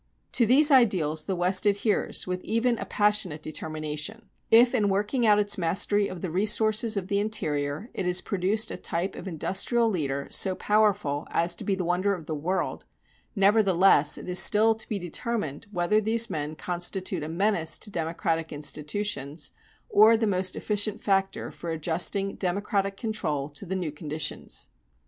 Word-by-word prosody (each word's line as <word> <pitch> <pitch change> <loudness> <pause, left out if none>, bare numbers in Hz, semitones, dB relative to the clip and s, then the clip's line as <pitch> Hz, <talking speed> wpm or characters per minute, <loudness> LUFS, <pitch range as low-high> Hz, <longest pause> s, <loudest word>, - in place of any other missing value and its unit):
To 235 - +2
these 290 +6 +6
ideals 180 - +3
the 190 - -2
West 185 +3 +2
adheres 205 +1 +1
with 180 0 -3
even 230 +1 0
a - - -4
passionate 205 -7 0
determination. 155 +7 -5 0.2
If, 240 +3 +6
in 210 -5 +2
working 210 +5 0
out 210 -1 +6
its 205 -1 0
mastery 200 +4 +1
of 180 - -8
the 180 - -4
resources 215 +3 +2
of 190 -2 -3
the 200 0 0
interior, 150 - -2
it 185 - -3
has 180 0 +4
produced 200 +4 -1
a - - -5
type 175 +4 -2
of 195 - -8
industrial 195 +7 0
leader 140 -9 -2
so 190 -1 +3
powerful 205 -10 +1
as 170 +1 +1
to - - -8
be 195 - 0
the 185 -2 -3
wonder 185 +3 +1
of 165 -4 -10
the 160 - -4
world, 170 +6 -2 0.5
nevertheless, 195 -6 +4
it - - -9
is 180 0 +1
still 220 +2 +4
to 220 0 -7
be 210 - -1
determined 180 - -4
whether 205 +3 +1
these 230 +2 +1
men 150 0 -3
constitute 180 +1 -3
a 150 - -5
menace 170 -2 +1
to 210 - -7
democratic 165 -1 -2
institutions, 150 0 -4 0.4
or 220 +2 +6
the 225 - 0
most 185 -2 -1
efficient 210 0 -1
factor 195 -1 -1
for 170 - -8
adjusting 175 +5 -1
democratic 195 +1 -1
control 155 - -3
to 150 +6 -9
the 190 - -2
new 175 -5 -3
conditions. 155 0 -3
190 Hz, 170 wpm, -26 LUFS, 165-210 Hz, 0.5 s, these